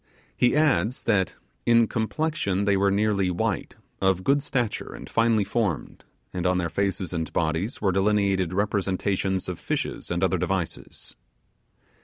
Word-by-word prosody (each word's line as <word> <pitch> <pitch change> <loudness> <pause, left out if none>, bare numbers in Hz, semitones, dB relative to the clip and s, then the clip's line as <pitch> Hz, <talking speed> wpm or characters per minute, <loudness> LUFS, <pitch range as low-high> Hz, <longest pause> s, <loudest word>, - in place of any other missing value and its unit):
He 125 +2 +3
adds, 130 - +2
that 100 -5 +1 0.3
'in 115 -1 +5
complexion 110 - -1
they 100 -1 +3
were 100 +1 +3
nearly 100 -1 +2
white; 90 - -2 0.3
of 95 -1 +2
good 140 +7 +3
stature, 125 -5 -2
and - - -9
finely 115 -2 +2
formed; 100 -7 -2 0.3
and 90 -1 -1
on 90 0 +2
their 85 -2 -1
faces 95 -1 -1
and 80 -2 -3
bodies 80 +9 -1
were 95 - +3
delineated 95 -2 +2
representations 95 -1 0
of 90 -2 -4
fishes - - -3
and 85 +1 -1
other 95 -1 +2
devices'. 95 -1 -4
100 Hz, 145 wpm, -25 LUFS, 90-110 Hz, 0.3 s, in